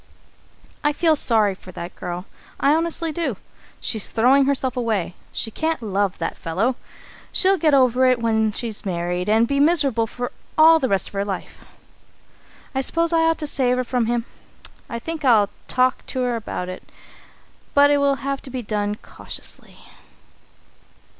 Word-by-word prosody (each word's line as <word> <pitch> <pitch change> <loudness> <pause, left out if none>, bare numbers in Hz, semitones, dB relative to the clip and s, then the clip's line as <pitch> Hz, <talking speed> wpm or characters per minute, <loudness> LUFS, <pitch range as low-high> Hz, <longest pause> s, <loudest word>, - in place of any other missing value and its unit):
"I 295 0 +2
feel 320 +1 +3
sorry 220 -8 +4
for 185 0 -13
that 170 +1 -7
girl, 180 0 -5 0.3
I 280 - +4
honestly 330 0 0
do. 335 +2 -2 0.4
She's 220 -3 -1
throwing 265 +4 +4
herself 265 -2 0
away. 220 -8 -1 0.2
She 225 - -3
can't 320 +6 -1
love 200 -4 -1
that - - -3
fellow. 195 +10 0 0.6
She'll 385 0 +3
get 305 -4 +4
over 255 -1 +4
it 255 -1 +4
when 220 -1 +1
she's 220 0 -4
married, 180 -1 -2
and 225 +2 +4
be 280 +2 0
miserable 280 -8 +3 0.5
all 320 +1 +7
the 260 - -1
rest 195 -1 +1
of - - -23
her 200 0 -1
life. 195 -2 -6 1.1
I 265 - 0
suppose 335 +4 0
I 330 - +4
ought 325 0 +2
to 305 - -4
save 255 -4 +2
her 255 - 0
from 245 -2 -1
him. 235 0 0 0.6
I 235 - -4
think 315 +6 -6
I'll 220 -6 +4 0.2
talk 255 0 +1
to 260 - -3
her 245 -1 0
about 210 -5 -4
it, 185 0 -7 0.9
but 285 0 +6
it 290 - +3
will 280 -1 +3
have 275 0 -2
to - - -10
be 255 -1 -5
done 205 -1 -2
cautiously. - - -7
250 Hz, 165 wpm, -22 LUFS, 210-285 Hz, 1.1 s, all